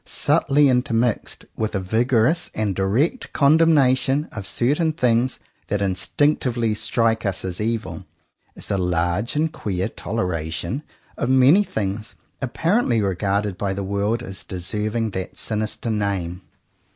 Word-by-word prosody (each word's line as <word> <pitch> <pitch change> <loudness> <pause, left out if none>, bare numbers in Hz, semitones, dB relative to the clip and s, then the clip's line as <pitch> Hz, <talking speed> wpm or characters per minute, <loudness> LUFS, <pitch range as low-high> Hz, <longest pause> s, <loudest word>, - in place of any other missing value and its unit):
Subtly 145 +1 +2
intermixed 125 -3 0
with 110 -1 -2
a - - +1
vigorous 115 - +2
and 105 -2 0
direct 115 - 0
condemnation 140 -2 +4
of 100 -3 -6
certain 150 +6 +1
things 125 -3 +1 0.3
that 100 - -1
instinctively 115 - +1
strike 110 +1 +1
us 100 -3 -2
as 90 +1 -3
evil, 115 0 -3 0.5
is - - -7
a 100 - +1
large 90 - 0
and 155 +2 0
queer 95 -2 -2
toleration 90 - -3 0.4
of 120 - -1
many 130 +9 +6
things 105 - -4 0.3
apparently 150 - +1
regarded 100 0 -1
by 100 -2 -1
the 100 - -3
world 100 +5 -1
as 95 -4 -7
deserving 105 +5 -2
that 95 -1 -5
sinister 110 +1 -2
name. 95 -4 -2
110 Hz, 125 wpm, -22 LUFS, 95-130 Hz, 0.5 s, many